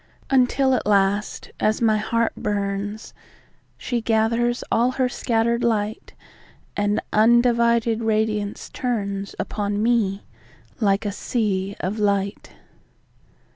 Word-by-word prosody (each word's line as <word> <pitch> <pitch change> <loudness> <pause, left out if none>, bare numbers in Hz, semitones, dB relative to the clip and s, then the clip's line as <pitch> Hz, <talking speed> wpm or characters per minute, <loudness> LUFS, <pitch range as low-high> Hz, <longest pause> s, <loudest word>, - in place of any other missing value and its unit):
Until 265 +1 +3
at 250 - -1
last, 200 0 +1
as 215 0 +1
my 220 -2 +3
heart 230 +2 0
burns, 205 +1 -3 0.6
She 240 -2 -2
gathers 230 +2 +1
all 240 +2 +3
her 255 -1 +1
scatter'd 235 -1 0
light, 220 -1 -1 0.6
And 205 0 +1
undivided 235 0 +3
radiance 215 -2 -1
turnsUpon 205 -2 -3
me 210 -3 +1 0.6
like 200 -1 +1
a 205 - -1
sea 200 -2 -2
of 195 +4 -3
light. 200 -1 -1
220 Hz, 100 wpm, -22 LUFS, 205-235 Hz, 0.6 s, Until